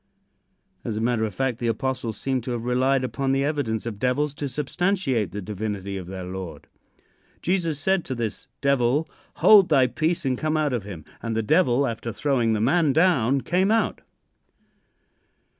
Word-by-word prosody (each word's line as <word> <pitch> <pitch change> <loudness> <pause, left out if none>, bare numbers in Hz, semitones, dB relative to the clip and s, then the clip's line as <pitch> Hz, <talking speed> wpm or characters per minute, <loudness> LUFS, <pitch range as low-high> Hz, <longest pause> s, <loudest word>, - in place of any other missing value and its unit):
As 110 -3 -3
a - - -1
matter 115 -1 +1
of 105 - -6
fact, 130 -3 -1
the 120 - -1
apostles 115 -1 -2
seemed 130 -3 -2
to 125 - -3
have 120 -1 -4
relied 130 +2 +2
upon 135 +1 -1
the 135 0 +1
evidence 140 -8 -1
of 110 -4 -5
devils 140 +4 0
to 145 -1 -4
substantiate 150 - -1
the 105 0 -5
divinity 100 -1 -4
of 95 -2 -6
their 95 0 -6
Lord. 90 -4 -7 0.8
Jesus 170 -5 0
said 190 +3 +1
to 130 - -4
this 115 -3 -4
devil: 140 +2 +2 0.3
"Hold 205 -4 +6
thy 135 -4 +5
peace 155 +5 -1
and 130 -2 0
come 155 0 0
out 150 -3 0
of 115 -5 -2
him." 90 -7 -8 0.2
And 115 -1 -3
the 115 - 0
devil, 140 - +3
after 115 -1 -4
throwing 120 -3 +1
the 110 - 0
man 145 +4 +3
down, 140 -6 +3
came 185 +6 +1
out. 225 +1 +1
130 Hz, 175 wpm, -24 LUFS, 110-150 Hz, 0.8 s, Hold